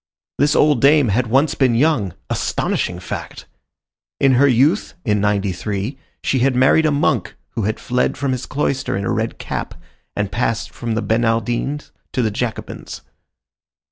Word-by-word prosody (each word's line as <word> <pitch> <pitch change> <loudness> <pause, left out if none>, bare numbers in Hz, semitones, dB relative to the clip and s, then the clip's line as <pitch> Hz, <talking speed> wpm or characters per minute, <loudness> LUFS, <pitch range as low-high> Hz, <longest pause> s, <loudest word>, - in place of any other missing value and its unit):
This 145 +2 +3
old 145 -5 +4
dame 140 -3 +5
had 120 +5 +1
once 135 +6 +3
been 130 -4 +2
young—astonishing 105 - 0
fact! 90 - -7 0.7
In 135 - +4
her 130 +3 +5
youth, 140 - +2
in 105 -3 +1
'93, 100 +3 -1 0.3
she 130 - +1
had 130 +1 +2
married 135 +5 +4
a - - +2
monk 140 - 0 0.2
who 115 -4 -2
had 110 +1 -1
fled 125 -1 0
from 140 -1 -1
his 130 -1 -3
cloister 135 -7 -1
in 100 - -3
a - - 0
red - - -2
cap, - - -5 0.4
and 105 -2 -2
passed 115 0 -1
from 115 -1 -4
the 110 - -1
Bernardines 120 +5 0 0.2
to 125 - +1
the 110 - +1
Jacobins. 115 +2 -5
120 Hz, 155 wpm, -19 LUFS, 110-140 Hz, 0.7 s, dame